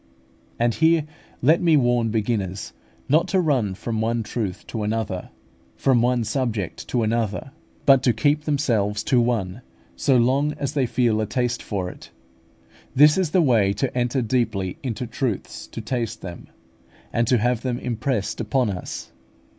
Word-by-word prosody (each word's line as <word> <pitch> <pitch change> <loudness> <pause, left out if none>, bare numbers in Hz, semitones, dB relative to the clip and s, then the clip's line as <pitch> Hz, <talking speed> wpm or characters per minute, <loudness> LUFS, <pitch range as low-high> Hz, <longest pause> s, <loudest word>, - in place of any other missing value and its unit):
And 120 0 +2
here 160 +1 +3 0.4
let 155 +6 +5
me 165 -3 +5
warn 120 -3 +2
beginners 105 -4 -2 0.3
not 155 +4 +3
to 190 - +2
run 130 - +1
from 110 +2 -3
one 115 +1 0
truth 105 -4 -4
to 110 - -5
another, 105 -3 -2 0.5
from 130 -3 +3
one 120 0 +2
subject 110 - -2
to 120 -2 0
another; 110 0 -1 0.3
but 135 -2 +6
to 130 - +3
keep 145 +7 +1
themselves 110 -8 0
to 125 0 +3
one 115 -3 -1 0.3
so 135 -3 +3
long 135 +5 +2
as 140 -1 -4
they 135 -4 +1
feel 115 -2 +1
a 110 - -1
taste 125 -1 -1
for 95 -4 -3
it: - - -10 0.9
this 150 +2 +7
is 185 -4 +1
the 175 +2 +3
way 110 -8 +3
to 125 +6 -2
enter 125 +1 0
deeply 110 -6 -1
into 125 -2 -3
truths, 120 -2 -4
to - - -7
taste 115 -3 -3
them, 85 -2 -8 0.7
and 115 0 +1
to 125 - +4
have 120 +1 +1
them 125 -2 -2
impressed 120 -2 -2
upon 115 0 +1
us. 90 -3 -6
120 Hz, 160 wpm, -23 LUFS, 110-130 Hz, 0.9 s, this